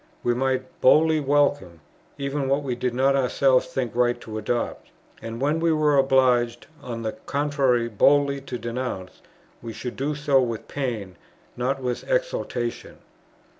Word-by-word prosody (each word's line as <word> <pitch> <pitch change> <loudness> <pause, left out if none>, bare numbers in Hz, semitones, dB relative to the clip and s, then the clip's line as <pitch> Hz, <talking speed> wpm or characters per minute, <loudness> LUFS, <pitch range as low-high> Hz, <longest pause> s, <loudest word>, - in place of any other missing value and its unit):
We 120 - +2
might 130 +1 -2
boldly 155 +4 +5
welcome, 140 - +1 0.4
even 140 -1 -2
what 140 +2 +1
we 130 -3 -2
did 125 0 -2
not 135 +2 +3
ourselves 130 0 +2
think 125 -5 -3
right 120 0 +2
to 110 -1 -6
adopt. 120 +2 -3 0.3
And, 115 +1 -6
when 150 +4 +1
we 165 0 +2
were 155 -2 +3
obliged 130 -3 +3 0.2
on 115 -2 -6
the 110 - -1 0.2
contrary 140 -4 +1
boldly 140 +5 +3
to 135 -2 -6
denounce, 120 -6 -5 0.4
we 115 -1 -7
should 125 +2 -6
do 145 +3 -2
so 145 -2 +3
with 115 -3 -3
pain, 110 -10 -4 0.4
not 130 +2 -2
with 125 -1 -2
exultation. - - -2
130 Hz, 150 wpm, -24 LUFS, 120-140 Hz, 0.4 s, boldly